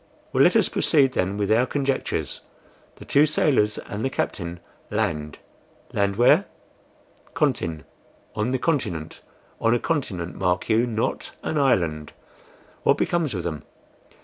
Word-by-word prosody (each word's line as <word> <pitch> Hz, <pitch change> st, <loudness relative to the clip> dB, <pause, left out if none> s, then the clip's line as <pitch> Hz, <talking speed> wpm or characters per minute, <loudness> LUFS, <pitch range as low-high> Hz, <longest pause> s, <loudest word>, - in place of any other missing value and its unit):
"Well, -, -, +3 dB
let -, -, +4 dB
us -, -, +4 dB
proceed 140 Hz, -4 st, +3 dB
then 95 Hz, -1 st, -1 dB
with 105 Hz, 0 st, 0 dB
our 120 Hz, +4 st, +4 dB
conjectures. 135 Hz, -2 st, -2 dB, 0.5 s
The -, -, -12 dB
two 145 Hz, +2 st, +4 dB
sailors 130 Hz, -8 st, +2 dB
and 105 Hz, -1 st, -6 dB
the 135 Hz, -, +1 dB
captain 85 Hz, -8 st, -3 dB, 0.3 s
LAND 75 Hz, -2 st, -2 dB, 0.6 s
land 100 Hz, -1 st, +1 dB
where? 120 Hz, +4 st, +5 dB, 0.9 s
CONTIN 80 Hz, -3 st, 0 dB, 0.5 s
on 110 Hz, +4 st, -1 dB
a 130 Hz, -, +1 dB
continent; 120 Hz, -, -2 dB, 0.4 s
on 115 Hz, +1 st, +3 dB
a -, -, +1 dB
continent, 95 Hz, -, -2 dB
mark 90 Hz, +2 st, 0 dB
you, 115 Hz, +2 st, +3 dB
not 110 Hz, -1 st, -2 dB
an 155 Hz, -, -1 dB
island. 85 Hz, -, +1 dB, 0.7 s
What -, -, +3 dB
becomes 165 Hz, -9 st, 0 dB
of 90 Hz, -, -3 dB
them? 80 Hz, -4 st, -4 dB
110 Hz, 140 wpm, -24 LUFS, 85-135 Hz, 0.9 s, where